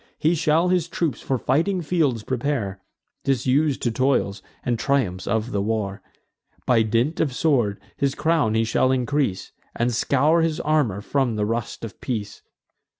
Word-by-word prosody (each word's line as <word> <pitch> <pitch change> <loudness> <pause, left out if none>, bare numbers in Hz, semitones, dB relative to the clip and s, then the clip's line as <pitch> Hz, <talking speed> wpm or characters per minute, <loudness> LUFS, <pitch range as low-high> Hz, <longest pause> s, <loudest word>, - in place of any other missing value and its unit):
He 160 +3 +2
shall 165 +2 +2
his 180 -3 +1
troops 165 -6 -2
for 135 - -1
fighting 170 - +1
fields 145 -9 +1
prepare, 120 -7 -2 0.4
Disus'd 135 +2 +1
to 120 - +1
toils, 125 -5 +1 0.2
and 120 -2 -1
triumphs 110 -9 0
of 110 +3 -1
the 100 - 0
war. 105 -2 -2 0.6
By 120 -3 +4
dint 115 +8 0
of 140 -5 0
sword 120 -9 +1 0.2
his 140 -1 0
crown 155 -9 +1
he 110 - +3
shall 120 +3 +2
increase, 130 -6 -1 0.2
And 120 +1 0
scour 145 +7 +3
his 160 -1 0
armour 145 -11 +1
from 130 0 0
the 105 -1 0
rust 115 +1 -3
of 105 - -11
peace. 105 -5 -4
130 Hz, 155 wpm, -23 LUFS, 110-150 Hz, 0.6 s, By